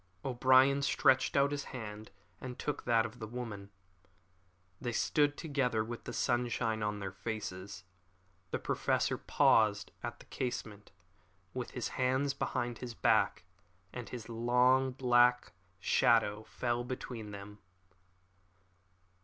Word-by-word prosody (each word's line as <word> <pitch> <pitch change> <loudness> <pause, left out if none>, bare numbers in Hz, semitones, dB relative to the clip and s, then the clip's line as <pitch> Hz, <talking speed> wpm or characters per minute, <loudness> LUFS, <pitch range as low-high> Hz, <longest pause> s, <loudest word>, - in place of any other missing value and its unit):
O'Brien 130 +2 +4
stretched 130 -1 +3
out 140 +1 +4
his 145 -1 -3
hand 110 -3 -7 0.3
and 125 -1 -7
took 150 - -4
that 115 -1 +3
of 120 +2 -8
the 110 - -5
woman. 110 -4 -6 1.1
They 120 - -2
stood 145 +4 +2
together 130 -8 0
with 120 +1 -7
the - - -5
sunshine 120 -2 0
on 105 0 -1
their 100 -2 -5
faces. 95 -1 -6 0.7
The - - -1
Professor - - 0
paused 105 -3 +3
at 120 0 -5
the - - -16
casement 110 -5 -5 0.6
with 125 -2 -4
his 125 - -2
hands 130 +2 +1
behind 120 -3 -2
his 120 -2 -7
back, - - +2 0.5
and 125 -2 -6
his 120 -3 -7
long 125 +3 +3
black 125 -1 +3 0.3
shadow 105 +1 +3
fell 120 -1 -2
between 120 -3 -6
them. 105 +1 -9
120 Hz, 125 wpm, -33 LUFS, 110-130 Hz, 1.1 s, O'Brien